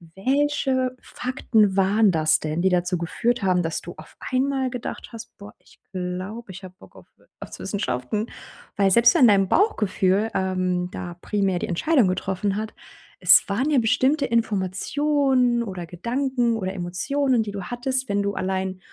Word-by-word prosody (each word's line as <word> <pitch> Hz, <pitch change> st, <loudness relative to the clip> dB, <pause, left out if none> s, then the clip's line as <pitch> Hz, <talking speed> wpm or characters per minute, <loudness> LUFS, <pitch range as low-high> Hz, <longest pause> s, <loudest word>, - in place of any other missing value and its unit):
Welche 265 Hz, +2 st, 0 dB
Fakten 220 Hz, -5 st, 0 dB
waren 195 Hz, +2 st, +3 dB
das 155 Hz, -1 st, +3 dB
denn, 155 Hz, +2 st, -3 dB
die 190 Hz, -, +3 dB
dazu 180 Hz, 0 st, +1 dB
geführt 225 Hz, +7 st, -1 dB
haben, 180 Hz, -2 st, +2 dB
dass 165 Hz, -1 st, -3 dB
du 175 Hz, -, -9 dB
auf -, -, -14 dB, 0.2 s
einmal 265 Hz, 0 st, 0 dB
gedacht 250 Hz, -1 st, -6 dB
hast: 230 Hz, 0 st, -10 dB
„Boah, 205 Hz, 0 st, -12 dB
ich -, -, -23 dB
glaube, 185 Hz, +3 st, -5 dB
ich 190 Hz, -, -11 dB
hab 185 Hz, 0 st, -11 dB
Bock -, -, -17 dB
auf -, -, -15 dB
Wirtschaftswissenschaften.” 205 Hz, -, -4 dB, 0.5 s
Weil 195 Hz, -1 st, +3 dB
selbst 235 Hz, +4 st, +6 dB
wenn 250 Hz, -, +6 dB
dein 195 Hz, -2 st, +3 dB
Bauchgefühl, 210 Hz, -, +1 dB
ähm, 185 Hz, -1 st, -1 dB
da 175 Hz, -1 st, -7 dB
primär 195 Hz, -2 st, -1 dB
die -, -, -3 dB
Entscheidung 245 Hz, -, +2 dB
getroffen 190 Hz, +2 st, -2 dB
hat, 220 Hz, +1 st, -4 dB, 0.5 s
es 180 Hz, +1 st, +7 dB
waren 250 Hz, +9 st, 0 dB
ja 290 Hz, -, +2 dB
bestimmte 265 Hz, +6 st, +2 dB
Informationen 240 Hz, +4 st, +1 dB
oder 185 Hz, -5 st, -6 dB
Gedanken 240 Hz, +6 st, -1 dB
oder 190 Hz, -3 st, -3 dB
Emotionen, 230 Hz, +8 st, 0 dB
die 205 Hz, -, -6 dB
du 200 Hz, -2 st, -6 dB
hattest, 260 Hz, +2 st, -2 dB
wenn 200 Hz, 0 st, 0 dB
du 200 Hz, 0 st, -2 dB
allein 190 Hz, 0 st, -2 dB
205 Hz, 160 wpm, -23 LUFS, 185-250 Hz, 0.5 s, es